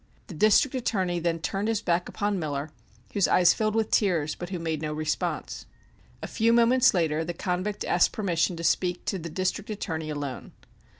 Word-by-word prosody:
The 190 Hz, -, -10 dB
District 215 Hz, -, +4 dB
Attorney 190 Hz, -8 st, -1 dB
then 170 Hz, 0 st, 0 dB
turned 195 Hz, +5 st, -2 dB
his 225 Hz, -1 st, -1 dB
back 175 Hz, -1 st, 0 dB
upon 205 Hz, -2 st, -1 dB
Miller, 145 Hz, -1 st, -3 dB, 0.4 s
whose 200 Hz, -3 st, +3 dB
eyes 180 Hz, -1 st, +5 dB
filled 215 Hz, -1 st, -1 dB
with 220 Hz, -1 st, 0 dB
tears, 165 Hz, -8 st, +2 dB
but 175 Hz, -, -7 dB
who 185 Hz, -, -3 dB
made 160 Hz, -2 st, -3 dB
no 155 Hz, -1 st, -3 dB
response. 155 Hz, 0 st, -3 dB, 0.6 s
A -, -, -3 dB
few 230 Hz, 0 st, +1 dB
moments 235 Hz, 0 st, +4 dB
later 160 Hz, -2 st, +1 dB
the 170 Hz, +1 st, -5 dB
convict 185 Hz, +4 st, -2 dB
asked 175 Hz, -, +3 dB
permission 180 Hz, -4 st, 0 dB
to 165 Hz, -, -6 dB
speak 180 Hz, +1 st, 0 dB
to 195 Hz, -, -2 dB
the 170 Hz, 0 st, -6 dB
District 185 Hz, +5 st, -2 dB
Attorney 160 Hz, -7 st, -4 dB
alone. 145 Hz, -3 st, -5 dB
180 Hz, 185 wpm, -26 LUFS, 160-210 Hz, 0.6 s, eyes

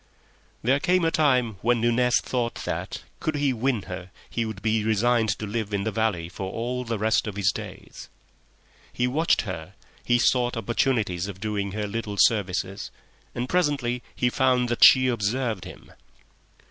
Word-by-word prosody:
There 130 Hz, +5 st, +3 dB
came 180 Hz, +2 st, +2 dB
a 165 Hz, -, +2 dB
time 130 Hz, -9 st, +2 dB
when 120 Hz, +1 st, +2 dB
Nunez 120 Hz, +1 st, +3 dB
thought 120 Hz, -2 st, -2 dB
that, -, -, -4 dB, 0.2 s
could 155 Hz, -, -2 dB
he 145 Hz, -2 st, +1 dB
win 120 Hz, -3 st, 0 dB
her, 90 Hz, 0 st, -7 dB, 0.2 s
he 115 Hz, -, -2 dB
would 110 Hz, -3 st, -7 dB
be 110 Hz, 0 st, +1 dB
resigned 110 Hz, +1 st, +2 dB
to 110 Hz, -, -5 dB
live 105 Hz, -1 st, -3 dB
in 100 Hz, -, -1 dB
the 110 Hz, -, -1 dB
valley 110 Hz, -7 st, -1 dB
for 95 Hz, +2 st, -6 dB
all 125 Hz, +2 st, -3 dB
the 115 Hz, -2 st, -3 dB
rest 110 Hz, +1 st, +1 dB
of 105 Hz, -, -5 dB
his 100 Hz, -1 st, +2 dB
days. -, -, -9 dB, 0.8 s
He 125 Hz, -, 0 dB
watched 150 Hz, +7 st, +2 dB
her; 80 Hz, -7 st, -7 dB, 0.3 s
he 120 Hz, -, +3 dB
sought 120 Hz, 0 st, +2 dB
opportunities 110 Hz, -5 st, 0 dB
of 95 Hz, -2 st, -8 dB
doing 100 Hz, -2 st, -2 dB
her 105 Hz, 0 st, -2 dB
little 105 Hz, -1 st, -4 dB
services 95 Hz, -2 st, +1 dB, 0.5 s
and 120 Hz, +1 st, -2 dB
presently 140 Hz, -8 st, 0 dB
he 125 Hz, -, +1 dB
found 125 Hz, -2 st, +2 dB
that 120 Hz, -, +1 dB
she 130 Hz, -1 st, +8 dB
observed 115 Hz, -2 st, -1 dB
him. -, -, -12 dB
115 Hz, 170 wpm, -25 LUFS, 105-125 Hz, 0.8 s, she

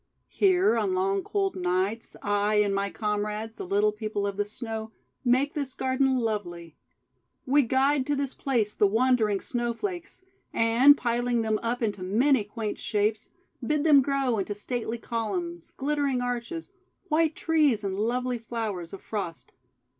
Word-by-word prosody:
"Here 370 Hz, -, +3 dB
on 200 Hz, -4 st, 0 dB
long 195 Hz, +1 st, +1 dB
cold 390 Hz, -, -1 dB
nights 185 Hz, +5 st, -1 dB
I 205 Hz, +1 st, +1 dB
and 205 Hz, -1 st, +3 dB
my 200 Hz, 0 st, 0 dB
comrades, 210 Hz, +1 st, -3 dB
the -, -, -6 dB
Little 205 Hz, +3 st, +3 dB
People 210 Hz, -1 st, -3 dB
of 200 Hz, -1 st, -2 dB
the 205 Hz, +1 st, 0 dB
Snow, 220 Hz, 0 st, -6 dB, 0.3 s
make 260 Hz, +4 st, +2 dB
this 280 Hz, -4 st, -4 dB
garden 260 Hz, 0 st, +1 dB
lovely. 175 Hz, -8 st, -3 dB, 0.7 s
We 285 Hz, +3 st, +4 dB
guide 265 Hz, +2 st, +2 dB
to 290 Hz, -, +1 dB
this 275 Hz, -1 st, -2 dB
place 230 Hz, -6 st, 0 dB
the 205 Hz, -, +3 dB
wandering 220 Hz, -2 st, +2 dB
Snowflakes, 295 Hz, -, -4 dB, 0.3 s
and, 240 Hz, +6 st, +6 dB
piling 240 Hz, -1 st, 0 dB
them 215 Hz, -1 st, 0 dB
up 240 Hz, +1 st, -2 dB
into 205 Hz, -3 st, -1 dB
many 230 Hz, +7 st, +3 dB
quaint 210 Hz, +1 st, -5 dB
shapes, 210 Hz, 0 st, -1 dB, 0.3 s
bid 300 Hz, +4 st, +1 dB
them 295 Hz, -4 st, +7 dB
grow 270 Hz, -4 st, 0 dB
into 205 Hz, +1 st, -3 dB
stately 235 Hz, +2 st, -3 dB
columns, 330 Hz, -, -4 dB
glittering 285 Hz, -2 st, 0 dB
arches, 245 Hz, +8 st, -4 dB, 0.4 s
white 320 Hz, 0 st, +2 dB
trees, 300 Hz, -9 st, +2 dB
and 195 Hz, -1 st, -2 dB
lovely 245 Hz, +4 st, -1 dB
flowers 215 Hz, -7 st, -4 dB
of 195 Hz, -, -9 dB
Frost. 195 Hz, -6 st, -5 dB
230 Hz, 150 wpm, -27 LUFS, 210-270 Hz, 0.7 s, them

